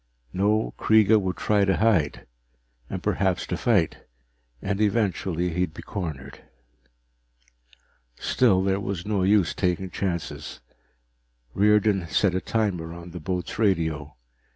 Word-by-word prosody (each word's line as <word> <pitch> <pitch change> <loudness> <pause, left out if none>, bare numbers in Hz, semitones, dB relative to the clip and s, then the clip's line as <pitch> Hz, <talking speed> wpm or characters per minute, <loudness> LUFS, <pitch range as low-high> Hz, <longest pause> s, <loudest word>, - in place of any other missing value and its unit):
No, 105 +3 +1
Kreega 110 0 +5
would 90 -2 -3
try 105 +2 +2
to 95 -1 +2
hide, 95 - +1 0.6
and - - -5
perhaps 95 -2 0
to 90 - -3
fight, 100 -4 +1 0.6
and 100 - -2
eventually 95 -5 0
he'd 90 -2 -1
be - - -9
cornered. 75 -9 -6 1.8
Still, 95 - +2
there 95 0 +1
was 95 -3 -4
no 105 -2 0
use 95 -3 +3
taking 90 0 -1
chances. 85 -4 -4 0.9
Riordan 105 -2 +3
set 90 +3 +2
a 95 - -1
timer 90 -7 -2
on 85 0 -10
the 90 - -7
boat's 90 +4 -4
radio. 80 -8 0
95 Hz, 125 wpm, -25 LUFS, 85-105 Hz, 1.8 s, Kreega